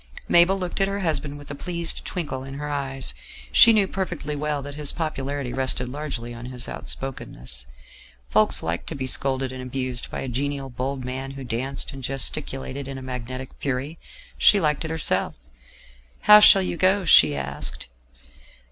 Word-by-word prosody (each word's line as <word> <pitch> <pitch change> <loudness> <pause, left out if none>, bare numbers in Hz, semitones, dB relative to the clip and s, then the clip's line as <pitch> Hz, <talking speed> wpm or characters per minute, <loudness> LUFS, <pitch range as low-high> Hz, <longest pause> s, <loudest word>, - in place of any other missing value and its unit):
Mabel 175 +3 +5
looked 185 +1 -3
at 195 - +3
her 200 0 -3
husband 150 -4 -2
with 145 0 -10
a - - -4
pleased 170 +3 0
twinkle 150 -8 -4
in 135 0 -8
her 150 +1 -5
eyes. 135 -2 -2 0.4
She 230 - +9
knew 210 -3 +3
perfectly 175 -6 -4
well 145 -1 -2
that 145 +1 -7
his 145 -1 -2
popularity 140 -5 -3
rested 130 -1 0
largely 130 -4 -5
on 120 +1 -8
his 125 -2 -5
outspokenness: 60 - -5 0.6
folks 60 - +2
liked 85 +1 -3
to 160 - -4
be 135 -2 -3
scolded 130 0 +1
and 130 0 -7
abused 130 -1 -1
by - - -5
a - - -4
genial 135 +2 -3
bold 130 +1 -4
man 130 +1 -4
who 135 - -6
danced 130 +4 -3
and 135 -1 -9
gesticulated 135 0 -2
in 135 -1 -6
a 130 - -8
magnetic 130 0 -6
fury; 140 +4 -3 0.4
she 205 - +6
liked 150 -4 +1
it 160 - -4
herself. 160 -1 0 0.9
"How 210 0 +9
shall 195 -2 +8
you 180 - -3
go?" 190 +2 +3
she 80 - +7
asked. 70 0 -4
135 Hz, 175 wpm, -24 LUFS, 130-155 Hz, 0.9 s, She